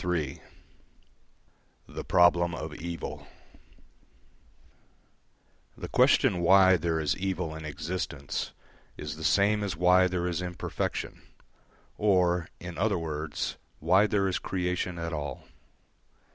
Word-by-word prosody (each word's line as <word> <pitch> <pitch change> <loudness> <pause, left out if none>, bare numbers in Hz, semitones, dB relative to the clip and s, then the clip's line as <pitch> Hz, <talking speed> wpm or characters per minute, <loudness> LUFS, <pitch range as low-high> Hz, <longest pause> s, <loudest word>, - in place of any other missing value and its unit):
III 85 -6 -2 1.5
THE - - -7
PROBLEM 85 -1 +4
OF 80 -1 -6
EVIL 85 +2 -6 2.5
The - - -7
question 90 - +4
why 95 +1 +6
there 85 -1 -1
is 75 -2 0
evil 90 -4 -2
in 80 0 -8
existence 75 -1 -4 0.5
is 75 -1 -5
the 80 - -9
same 100 +5 +3
as 95 -5 -3
why 90 +1 +5
there 90 -1 -2
is 90 -1 -1
imperfection, 90 -1 -4 0.8
or, 90 -4 +2
in 85 -1 -7
other 100 -1 +2
words, 75 -2 -4 0.2
why 95 +6 +4
there 100 -2 +1
is 95 +1 -1
creation 90 -1 -2
at 85 0 -4
all. 75 -4 -5
85 Hz, 115 wpm, -28 LUFS, 80-95 Hz, 2.5 s, why